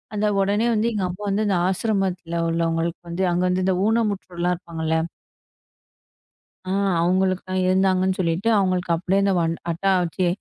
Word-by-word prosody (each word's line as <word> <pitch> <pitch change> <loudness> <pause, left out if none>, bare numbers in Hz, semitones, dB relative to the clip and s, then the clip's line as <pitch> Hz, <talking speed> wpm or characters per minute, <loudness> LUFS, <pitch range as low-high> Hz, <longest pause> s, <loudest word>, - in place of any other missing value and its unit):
அத 210 0 +1
உடனே 205 +4 +1
வந்து 220 +1 +1
எங்க 200 -3 -1
அப்பா 190 +4 -7
வந்து 205 +2 +1
அந்த 195 - +2
ஆசிரமத்துல 190 -4 -1
உள்ளவங்களுக்கு 165 0 -1
வந்து 180 +3 -2
அங்க 175 +1 0
வந்து 185 +1 +1
ஊனமுற்றோர் 205 -6 -1
இருப்பாங்கல்ல. 160 -2 -3 1.7
ஆ, - - -2 0.3
அவுங்களுக்கு 185 +1 +1
தான் 185 0 0
இருந்தாங்கன்னு 185 0 +2
சொல்லிட்டு 170 +5 0
அவுங்களுக்கு 185 -3 0
அப்பிடியே 185 +4 +1
அந்த 195 -1 +2
வன் 165 0 0 0.2
அட்டா 195 +4 0
வச்சி, 175 +2 -1
185 Hz, 145 wpm, -23 LUFS, 170-195 Hz, 1.7 s, அந்த